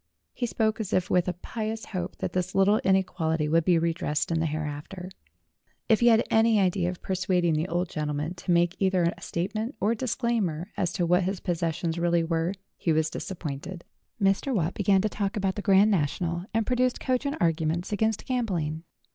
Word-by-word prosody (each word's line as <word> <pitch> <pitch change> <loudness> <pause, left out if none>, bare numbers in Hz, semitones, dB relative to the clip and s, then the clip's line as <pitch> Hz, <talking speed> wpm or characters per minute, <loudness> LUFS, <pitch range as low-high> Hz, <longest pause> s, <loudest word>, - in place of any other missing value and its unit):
He 240 - -2
spoke 220 -1 0
as 215 -4 -3
if 185 -1 +1
with 180 -1 +3
a 180 - 0
pious 220 +5 -5
hope 180 -2 -4
that - - -4
this 185 0 -2
little 200 +3 +4
inequality 165 -5 +1
would 165 +2 +3
be 175 +1 +4
redressed 165 -2 -1
in 165 - +1
the 160 - +1
hereafter. 155 +5 -5 0.8
If 220 - +4
he 240 - +4
had 230 -1 +5
any 225 -1 +4
idea 185 -2 +1
of 180 - -7
persuading 185 -3 +1
the 155 +3 0
old 175 +1 -1
gentleman 150 +1 -3
to 180 +1 -11
make 175 0 +3
either 190 -2 +3
a - - -17
statement 215 +8 -3
or 210 +3 +2
disclaimer 220 -8 -1
as 175 - 0
to 175 - 0
what 180 +2 +3
his 190 0 -2
possessions 165 -1 -2
really 170 -1 +2
were, 165 +2 0 0.2
he 165 - 0
was 160 0 +1
disap 190 - -5
pointed. 160 +4 -6 0.4
Mr. 195 +7 +2
Watt 170 -2 0
began 195 -1 +3
to 215 - +1
talk 200 0 -2
about 195 -2 0
the 205 - -5
Grand 200 +1 +5
National, 170 +1 -1
and 225 0 0
produced 250 +1 +1
cogent 270 +3 -1
arguments 165 +2 0
against 220 +1 0
gambling. 180 -12 -1
180 Hz, 190 wpm, -27 LUFS, 165-210 Hz, 0.8 s, had